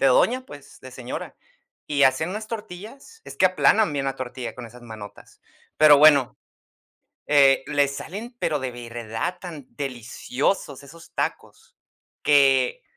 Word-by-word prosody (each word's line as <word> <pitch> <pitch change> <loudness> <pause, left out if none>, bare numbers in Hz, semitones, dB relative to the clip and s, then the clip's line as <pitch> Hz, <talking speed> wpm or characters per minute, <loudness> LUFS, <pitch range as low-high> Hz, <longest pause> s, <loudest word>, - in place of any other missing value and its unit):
de 135 - +4
doña, 245 - +3
pues, 145 -1 -13
de 130 -1 -12
señora. 125 -1 -7 0.5
Y 140 -2 +3
hacían 135 +6 +2
unas 215 +2 -5
tortillas, 225 - -9
es - - -10
que 185 - +5
aplanan 185 0 +3
bien 140 -1 -2
la 135 -1 -2
tortilla 125 -1 -6
con 125 -2 -9
esas 120 +2 -15
manotas, 110 -3 -12 0.4
pero 150 -2 +7
bueno, 145 -4 +5 0.9
eh, 140 -2 +5
les 140 -1 +1
salen, 205 - -7
pero 155 -3 0
de 130 -2 -4
verdad, 120 +7 -5
tan 160 -7 -9
deliciosos 135 - -3
esos 165 +4 -15
tacos - - -5 0.5
que 135 -3 +3
140 Hz, 145 wpm, -23 LUFS, 130-170 Hz, 0.9 s, pero